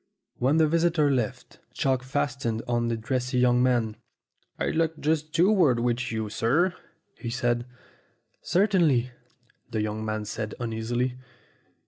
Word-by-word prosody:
When 135 +5 +3
the 160 - +5
visitors 165 -2 +2
left, 120 -5 -3 0.2
Chalk 130 -2 +1
fastened 130 -4 -2
on 120 -1 0
to 115 - 0
the - - -5
dressy 125 +2 -1
young 125 0 +4
man. 120 -4 +1 0.6
"I'd - - -1
like 165 -1 0
just 155 0 0
two 180 +6 +4
words 155 - +4
with 120 0 -1
you, 110 -1 -2
sir," 140 - +1 0.5
he 115 - -4
said. 120 0 0 0.7
"Certainly," 170 - +2 0.6
the 110 -3 -1
young 110 0 -3
man 110 -1 -3
said 110 0 -4
uneasily. 120 +2 -2
125 Hz, 140 wpm, -26 LUFS, 115-150 Hz, 0.7 s, the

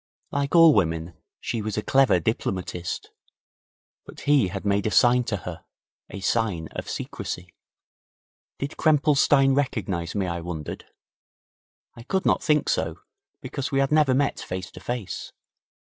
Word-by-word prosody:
Like 140 +2 -1
all 165 -2 +8
women, 80 -4 0 0.3
she 115 - -3
was 110 0 -4
a 105 - -1
clever 135 -9 +4
diplomatist. 90 -2 -3 0.9
But - - -12
he 140 -8 +3
had 95 +2 -6
made 100 +1 +1
a - - +2
sign 120 +2 +4
to 105 - -1
her 90 -2 -8 0.5
a 100 - -7
sign 100 -7 0
of - - -6
secrecy. 90 0 -5 1.0
Did 140 +1 -5
Krempelstein 145 -3 +4
recognize 100 -11 -2
me, 100 -2 0
I 85 -1 -3
wondered? 80 -3 -6 1.1
I 115 - -12
could 190 +10 -2
not - - +3
think 150 -2 +2
so, 80 +1 0 0.4
because 140 0 -4
we 135 - +1
had 135 +1 +2
never 150 -4 +4
met 140 +1 +1
face 95 +1 -6
to - - -11
face. 120 -7 -5
110 Hz, 150 wpm, -25 LUFS, 90-140 Hz, 1.1 s, all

